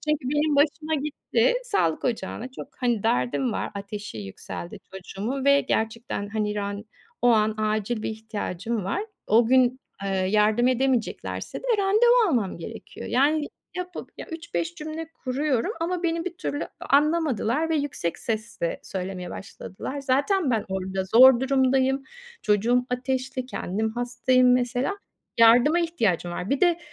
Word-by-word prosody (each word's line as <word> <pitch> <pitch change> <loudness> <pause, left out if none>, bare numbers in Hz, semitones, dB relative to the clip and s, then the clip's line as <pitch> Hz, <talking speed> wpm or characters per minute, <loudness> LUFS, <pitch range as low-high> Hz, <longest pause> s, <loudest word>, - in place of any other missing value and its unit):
Çünkü 290 -4 0
benim 295 0 +2
başıma 305 +2 +2
gitti. 300 - +1
Sağlık 400 - 0
ocağına 230 0 -2
çok - - -8
hani, 240 -5 0
derdim 130 - +1
var, - - -3
ateşi 200 - -6
yükseldi 110 - -7
çocuğumun 210 +8 -4
ve 280 0 +6
gerçekten, 220 -2 -2
hani, 210 0 -1
ran 205 +1 -3 0.4
o 245 - +5
an 215 -2 +3
acil 215 +1 -1
bir - - -2
ihtiyacım 215 -1 -4
var. 360 - -1 0.2
O 225 +2 +4
gün, 255 +1 +3 0.2
eee, 195 - -1
yardım 210 +5 +2
edemeyeceklerse 255 -2 -1
de - - -18
randevu 445 +4 +4
almam 225 - 0
gerekiyor. 220 +7 -8
Yani 290 +4 +2 0.3
yapıp, 360 -1 -6
ya, - - -7
3-5 335 0 -4
cümle 315 0 -6 0.2
kuruyorum 270 - 0
ama 355 +1 -1
beni 330 -1 0
bir 365 -2 -5
türlü 290 -5 -3
a - - -12 0.3
anlamadılar 300 -2 +1
ve 320 - +2
yüksek 280 - -2
sesle 220 -6 -3
söylemeye 185 -1 -5
başladılar. 230 +8 -7
Zaten 280 +4 +1
ben 225 -3 +1
orada 190 0 -2
zor 240 +5 +7
durumdayım. 265 0 +2 0.4
Çocuğum 235 +4 +2
ateşli, 255 +1 -2
kendim 220 -2 -2
hastayım 245 +2 +2
mesela. 250 +9 0 0.4
Yardıma 245 +9 +6
ihtiyacım 215 - 0
var. 180 +5 -4
Bir 275 - +1
de 345 -2 +4
250 Hz, 145 wpm, -25 LUFS, 210-295 Hz, 0.4 s, zor